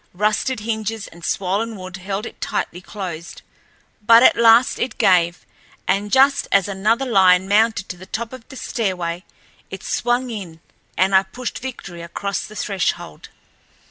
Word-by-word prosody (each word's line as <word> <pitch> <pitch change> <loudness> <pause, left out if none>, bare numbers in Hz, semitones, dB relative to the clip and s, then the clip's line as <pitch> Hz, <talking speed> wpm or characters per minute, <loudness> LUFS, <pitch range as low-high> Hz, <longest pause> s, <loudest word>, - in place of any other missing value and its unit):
Rusted 215 +4 0
hinges 220 -1 -3
and 170 +1 -15
swollen 200 +6 -1
wood 185 -1 -8
held 195 +3 -4
it - - -10
tightly 175 - -3
closed. 180 -5 -7 0.6
But 230 +3 +7
at - - +7
last 235 +1 +5
it 245 - -2
gave, 175 -2 +3 0.4
and 200 +2 0
just 270 +1 +4
as 195 -1 +3
another 215 +6 0
lion 190 -5 +4
mounted 215 0 +2
to 185 - -6
the 185 +1 -12
top 235 +2 -4
of 255 -3 -11
the - - -10
stairway 180 -8 -3 0.5
it 190 0 -8
swung 245 +1 0
in, 180 -7 -7 0.4
and 190 +1 +2
I 190 - +7
pushed 240 +6 -6
Victory 195 -9 -7
across 200 +4 -3
the 215 - -13
threshold. 190 - -3
200 Hz, 155 wpm, -20 LUFS, 185-230 Hz, 0.6 s, But